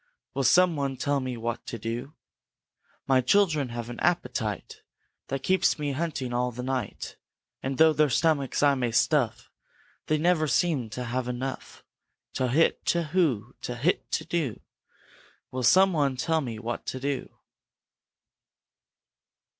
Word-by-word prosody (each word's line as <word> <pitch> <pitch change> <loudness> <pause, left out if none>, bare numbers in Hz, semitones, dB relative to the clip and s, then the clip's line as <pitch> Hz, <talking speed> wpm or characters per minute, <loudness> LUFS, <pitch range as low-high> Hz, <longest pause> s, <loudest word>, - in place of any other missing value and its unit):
Will 135 - -1
some 175 +5 +5
one 140 -2 -2
tell 145 +1 0
me 130 -2 -4
what 115 0 -3
to 115 - -4
do? 115 +6 -5 0.9
My 130 -1 +4
children 155 -2 +2
have 120 -1 -5
an 120 0 -7
appetite 120 - -1 0.5
That 135 0 -4
keeps 190 0 +2
me 145 -2 -2
hunting 140 -4 -3
all 125 +1 0
the 125 +1 -6
night, 130 -5 -4 0.4
And 135 0 -3
though 160 0 +6
their 150 -1 +3
stomachs 145 0 +1
I 145 -1 +6
may 125 -3 0
stuff 125 +1 +1 0.6
They 155 - +2
never 160 0 +2
seem 145 -7 +1
to 125 +4 -5
have 125 +1 -2
enough. 125 +2 -5 0.5
Towhit, 130 +5 +2
towhoo! 155 - 0
Towhit, 125 +9 -1
towhoo! 150 - -2 0.9
Will 130 - -3
some 185 +10 +5
one 140 -4 +1
tell 160 +4 +1
me 120 -5 -5
what 115 +2 -5
to 130 - -3
do?" 140 0 -3
135 Hz, 140 wpm, -27 LUFS, 125-155 Hz, 0.9 s, though